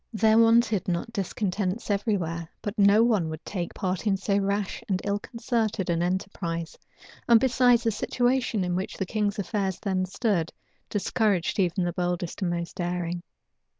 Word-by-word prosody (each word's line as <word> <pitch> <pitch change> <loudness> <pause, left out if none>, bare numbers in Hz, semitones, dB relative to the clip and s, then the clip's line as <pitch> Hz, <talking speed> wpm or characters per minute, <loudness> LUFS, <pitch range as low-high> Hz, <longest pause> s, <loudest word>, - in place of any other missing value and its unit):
There 220 0 +4
wanted 230 -3 +4
not 180 +6 -2
discontents 200 +1 -2
every 205 +1 +1
where, 165 -1 -4
but 205 - -2
no 205 +2 +5
one 210 -9 +2
would 155 +1 -7
take 175 -4 -4
part 185 +2 -2
in 195 -2 +3
so 195 +1 0
rash 200 0 -1
and 190 -2 +1
ill 200 0 0
concerted 225 -5 -1
an 170 0 0
enterprise; 175 -2 -2 0.5
and 235 -1 +8
besides, 245 -1 +4
the 225 - +2
situation 245 -1 0
in 180 -1 -1
which 185 +1 -3
the 190 - -1
king's 210 +1 -1
affairs 195 -2 -2
then 185 -2 -1
stood 190 -5 0 0.4
discouraged 205 -3 0
even 180 0 +1
the 175 0 -1
boldest 175 +1 -2
and 185 - +1
most 170 -1 -3
daring. 175 -1 -2
195 Hz, 165 wpm, -26 LUFS, 175-220 Hz, 0.5 s, and